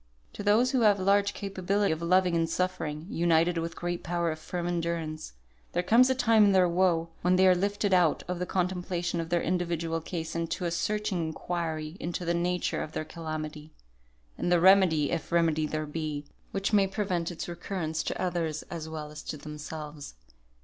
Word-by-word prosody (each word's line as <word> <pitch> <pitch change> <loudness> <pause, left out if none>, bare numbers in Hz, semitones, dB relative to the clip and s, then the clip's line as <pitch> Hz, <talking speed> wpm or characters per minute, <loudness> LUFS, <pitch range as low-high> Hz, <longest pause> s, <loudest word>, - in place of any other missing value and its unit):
To - - -6
those 215 +5 +3
who 260 -3 +2
have 205 -3 +5
large 200 +1 +2
capability 200 +1 0
of 160 +1 -2
loving 180 +1 +3
and 165 -1 +1
suffering, 165 -4 -2
united 170 -1 +2
with 165 0 -4
great 175 0 -3
power 170 0 -1
of 155 - -6
firm 175 +2 -4
endurance, 165 - -3 0.4
there 175 - +1
comes 240 +7 +5
a 260 - +2
time 230 -4 +4
in 200 - +4
their 185 -1 +5
woe, 170 -1 +2
when 180 +1 +3
they 190 +1 +5
are 185 - +7
lifted 200 +2 0
out 175 -4 +3
of 180 -1 -3
the 180 - -2
contemplation 180 -2 -1
of 165 - -6
their 170 0 +1
individual 170 -2 -1
case 165 -1 -5
into 165 +2 -2
a 170 - 0
searching 210 +2 -1
inquiry 160 0 -4
into 175 +1 -4
the 170 - +1
nature 175 +1 0
of 155 - -6
their 155 - -3
calamity, 155 -2 -6 0.7
and 175 - 0
the 175 - +5
remedy 180 -5 +5
(if 170 0 -3
remedy 160 -2 +2
there 155 0 -2
be) 150 -1 -4 0.2
which 195 +2 -2
may 200 -2 +5
prevent 190 -4 -1
its 175 - -6
recurrence 170 -2 -3
to - - -4
others 165 -4 -1
as 160 -2 -5
well 155 -1 -6
as 150 -1 -8
to 150 - -6
themselves. 150 - -8
170 Hz, 190 wpm, -28 LUFS, 160-185 Hz, 0.7 s, are